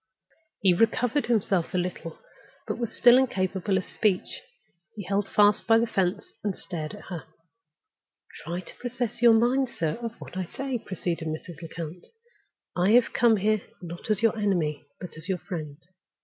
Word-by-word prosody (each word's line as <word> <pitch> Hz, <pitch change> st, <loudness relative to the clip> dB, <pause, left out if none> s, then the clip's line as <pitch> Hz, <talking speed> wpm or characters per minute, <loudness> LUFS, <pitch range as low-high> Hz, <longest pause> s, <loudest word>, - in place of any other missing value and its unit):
He 190 Hz, -3 st, +5 dB
recovered 225 Hz, +7 st, +2 dB
himself 195 Hz, -6 st, +1 dB
a -, -, +3 dB
little, 175 Hz, -2 st, -4 dB, 0.5 s
but -, -, -2 dB
he -, -, -9 dB
was 235 Hz, -2 st, -2 dB
still 245 Hz, +1 st, +6 dB
incapable 190 Hz, -5 st, 0 dB
of 185 Hz, -, -2 dB
speech. 200 Hz, -4 st, -1 dB, 0.5 s
He 205 Hz, -, -6 dB
held 200 Hz, +2 st, -1 dB
fast 205 Hz, 0 st, +4 dB
by 225 Hz, 0 st, +6 dB
the 230 Hz, -, +3 dB
fence, 195 Hz, -3 st, -1 dB
and 205 Hz, -3 st, -1 dB
stared 160 Hz, -1 st, -5 dB
at 205 Hz, -, -12 dB
her. 165 Hz, -7 st, -6 dB, 1.2 s
"Try 175 Hz, +3 st, -4 dB
to -, -, -11 dB
possess 245 Hz, -2 st, -3 dB
your 235 Hz, -1 st, +8 dB
mind, 250 Hz, +3 st, +3 dB
sir, 165 Hz, -3 st, -2 dB
of 230 Hz, -1 st, -4 dB
what -, -, -10 dB
I 185 Hz, -1 st, -2 dB
say," 265 Hz, +6 st, -4 dB
proceeded 170 Hz, -5 st, -4 dB
Mrs. 155 Hz, +1 st, -6 dB
Lecount. 165 Hz, +1 st, -7 dB, 0.7 s
"I 185 Hz, +4 st, +3 dB
have 245 Hz, 0 st, +5 dB
come 230 Hz, -2 st, +4 dB
here 215 Hz, +1 st, +1 dB, 0.2 s
not 170 Hz, +3 st, -8 dB
as 215 Hz, 0 st, +2 dB
your 225 Hz, -1 st, +4 dB
enemy, 175 Hz, -9 st, -1 dB
but 180 Hz, -3 st, -8 dB
as 160 Hz, +4 st, -2 dB
your 190 Hz, -, +1 dB
friend. 155 Hz, -6 st, -6 dB
195 Hz, 175 wpm, -27 LUFS, 175-225 Hz, 1.2 s, your